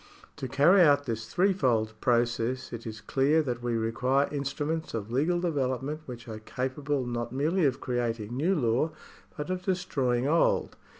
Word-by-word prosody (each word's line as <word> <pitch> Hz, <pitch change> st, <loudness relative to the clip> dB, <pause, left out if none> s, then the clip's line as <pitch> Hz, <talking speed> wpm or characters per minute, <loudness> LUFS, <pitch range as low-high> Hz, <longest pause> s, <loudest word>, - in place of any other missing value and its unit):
To 130 Hz, -, -4 dB
carry 145 Hz, +9 st, +5 dB
out 145 Hz, -3 st, +5 dB
this 115 Hz, -2 st, -4 dB
threefold 130 Hz, -, +2 dB
process, 120 Hz, 0 st, 0 dB
it 115 Hz, 0 st, -6 dB
is 110 Hz, 0 st, -7 dB
clear 145 Hz, +4 st, +2 dB
that 125 Hz, -4 st, -3 dB
we 120 Hz, -1 st, -1 dB
require 125 Hz, +5 st, +1 dB
instruments 145 Hz, +2 st, -3 dB
of 110 Hz, 0 st, -4 dB
legal 155 Hz, +8 st, +1 dB
development 145 Hz, -3 st, -1 dB
which 120 Hz, -2 st, -8 dB
are 110 Hz, -1 st, -6 dB
capable 130 Hz, +4 st, -2 dB
not 120 Hz, -1 st, -3 dB
merely 155 Hz, +7 st, +1 dB
of 135 Hz, -1 st, +1 dB
creating 120 Hz, -2 st, -2 dB
new 170 Hz, +9 st, +2 dB
law, 125 Hz, +1 st, +1 dB, 0.5 s
but 150 Hz, +4 st, -4 dB
of 185 Hz, 0 st, -2 dB
destroying 140 Hz, -10 st, 0 dB
old. 165 Hz, +3 st, +2 dB
130 Hz, 160 wpm, -28 LUFS, 120-150 Hz, 0.5 s, carry